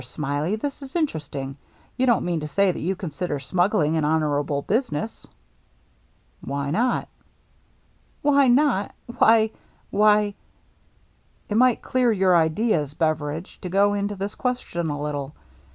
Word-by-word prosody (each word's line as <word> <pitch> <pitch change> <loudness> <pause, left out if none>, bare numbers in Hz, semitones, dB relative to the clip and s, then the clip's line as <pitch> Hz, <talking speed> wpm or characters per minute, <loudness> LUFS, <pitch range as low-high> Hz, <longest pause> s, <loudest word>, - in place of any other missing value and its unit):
Smiley, 150 +5 -2
this 280 +6 -5
is 270 +2 -10
interesting. 145 - -3 0.4
You 260 - +1
don't 235 -4 +3
mean 175 -2 -1
to 150 - -5
say 195 +6 +2
that - - -6
you 185 +4 -1
consider 175 -4 -4
smuggling 175 +2 +1
an 155 - 0
honorable 145 -2 0
business? 220 - -2 0.6
" - - -39
"Why 140 0 -3
not?" 240 +8 +1 0.6
" - - -38
Why 280 -2 +4
not! 245 -6 +2 0.2
Why 220 0 +5 0.2
— - - -36
why 210 0 +4 0.3
— - - -38
" - - -37
" - - -39
It - - 0
might 250 -1 +3
clear 250 -2 +2
your 190 -3 +3
ideas, 160 - +1
Beveridge, 155 +1 -2
to 180 - -5
go 200 +2 +3
into 205 0 -2
this 200 +2 -4
question 245 -10 -2
a 145 -1 -3
little. 145 -1 -4
180 Hz, 155 wpm, -24 LUFS, 150-220 Hz, 0.6 s, Why